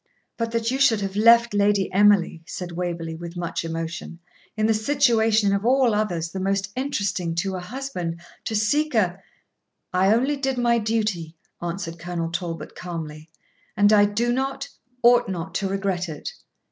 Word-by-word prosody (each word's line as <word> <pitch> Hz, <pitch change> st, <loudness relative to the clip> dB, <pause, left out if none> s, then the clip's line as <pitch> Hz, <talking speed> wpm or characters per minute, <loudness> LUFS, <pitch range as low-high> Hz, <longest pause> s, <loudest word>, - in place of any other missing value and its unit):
'But 230 Hz, -1 st, -2 dB
that 230 Hz, 0 st, 0 dB
you 265 Hz, -, -1 dB
should 245 Hz, -6 st, +4 dB
have 195 Hz, -1 st, -3 dB
left 230 Hz, +1 st, +5 dB
Lady 205 Hz, -2 st, +2 dB
Emily,' 200 Hz, -4 st, +4 dB
said 180 Hz, -1 st, -6 dB
Waverley, 170 Hz, -1 st, -3 dB
with 170 Hz, +1 st, -8 dB
much 170 Hz, -1 st, -3 dB
emotion, 165 Hz, +1 st, -5 dB, 0.4 s
'in 215 Hz, -, +1 dB
the 225 Hz, -, +3 dB
situation 220 Hz, -4 st, +3 dB
of 200 Hz, 0 st, 0 dB
all 250 Hz, -1 st, +3 dB
others 175 Hz, -6 st, -1 dB
the 190 Hz, -, -5 dB
most 195 Hz, +1 st, -1 dB
interesting 200 Hz, -10 st, -2 dB
to 190 Hz, +3 st, -1 dB
a -, -, -3 dB
husband, 180 Hz, -5 st, -5 dB, 0.3 s
to 220 Hz, -, -2 dB
seek 285 Hz, +7 st, +1 dB
a 190 Hz, -3 st, +1 dB, 0.4 s
' -, -, -50 dB
'I 190 Hz, +2 st, +3 dB
only 270 Hz, +5 st, +1 dB
did 270 Hz, -2 st, -1 dB
my 235 Hz, -1 st, +3 dB
duty,' 210 Hz, -7 st, -2 dB, 0.2 s
answered 170 Hz, -1 st, -4 dB
Colonel 170 Hz, -1 st, -4 dB
Talbot, 170 Hz, -1 st, -5 dB
calmly, 160 Hz, -3 st, -7 dB, 0.5 s
'and 205 Hz, +1 st, +5 dB
I 205 Hz, -1 st, +6 dB
do 230 Hz, +4 st, 0 dB
not, 270 Hz, +2 st, -2 dB, 0.3 s
ought 240 Hz, -2 st, +5 dB
not, 180 Hz, 0 st, -4 dB
to 195 Hz, +1 st, -1 dB
regret 190 Hz, -2 st, -1 dB
it. 150 Hz, -2 st, -6 dB
200 Hz, 170 wpm, -24 LUFS, 175-230 Hz, 0.5 s, I